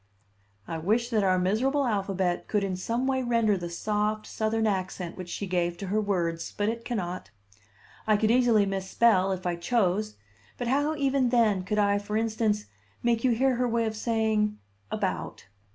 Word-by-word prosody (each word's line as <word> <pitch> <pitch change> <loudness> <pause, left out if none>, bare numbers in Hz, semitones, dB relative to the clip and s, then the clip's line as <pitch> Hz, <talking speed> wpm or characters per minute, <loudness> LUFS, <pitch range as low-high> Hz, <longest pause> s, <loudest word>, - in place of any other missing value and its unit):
I 165 - -4
wish 225 +8 0
that 215 -3 +2
our 185 -1 +3
miserable 250 +10 +1
alphabet 195 -5 -1
could 210 -2 0
in 190 -2 -1
some 230 +7 -2
way 265 -1 +1
render 230 -4 +2
the 175 -2 -5
soft 210 +4 -1
Southern 220 0 -1
accent 185 -3 -2
which 180 -2 -8
she 200 - -4
gave 175 -2 -1
to 195 - -6
her 215 - +2
words. 170 -5 -2
But 205 +1 +1
it 230 +1 -4
cannot. 185 -7 -4 0.8
I 215 -1 +4
could 215 +1 +2
easily 235 -4 +4
misspell, 195 +1 +2
if 185 -1 -4
I 175 -1 0
chose; 210 +2 0 0.4
but 245 - -3
how, 290 +5 +1
even 275 -3 +1
then, 225 -6 +3
could 200 +3 -2
I, 205 -1 +3
for 210 +1 -3
instance, 220 -2 0 0.4
make 235 -1 +1
you 260 - +4
hear 255 +2 +2
her 250 0 +1
way 230 0 +1
of 220 0 -2
saying 220 -2 0 0.3
"about"? - - -3
215 Hz, 180 wpm, -27 LUFS, 190-235 Hz, 0.8 s, I